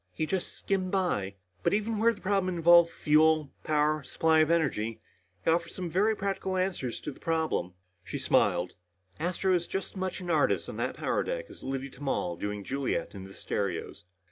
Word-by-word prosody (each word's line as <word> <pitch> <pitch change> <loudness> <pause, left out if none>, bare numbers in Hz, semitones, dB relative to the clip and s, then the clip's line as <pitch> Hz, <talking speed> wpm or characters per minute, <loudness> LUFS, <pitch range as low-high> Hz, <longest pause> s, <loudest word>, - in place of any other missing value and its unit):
"He 155 - -1
just 185 +2 -2
skimmed 190 -2 -1
by. 175 - 0 0.3
But 200 - +2
even 215 +1 -1
where 230 +2 +5
the 205 - -10
problem 190 -2 +1
involved 170 0 +7
fuel, 155 -1 +3
power, 155 0 +2
supply 160 +3 +2
of 155 0 +4
energy, 130 -10 0 0.5
he - - +4
offered 170 +1 +1
some 180 -3 -5
very 210 +6 +3
practical 195 -1 -2
answer 185 -9 -1
to 135 - -5
the - - -15
problem." 160 - -1 0.3
She 140 - -5
smiled. 95 -9 +2 0.5
"Astro 180 +3 +1
is 175 -1 +1
as 195 - -3
much 185 -1 -3
an 180 -2 -3
artist 155 -3 +2
on - - -7
that - - -2
power - - 0
deck - - -3
as - - -12
Liddy 135 0 -4
Tamal 135 -11 -2
doing 105 +3 -4
Juliet 135 +5 -2
in 95 -2 -8
the 95 - -12
stereos." 100 -4 -3
160 Hz, 185 wpm, -29 LUFS, 130-185 Hz, 0.5 s, involved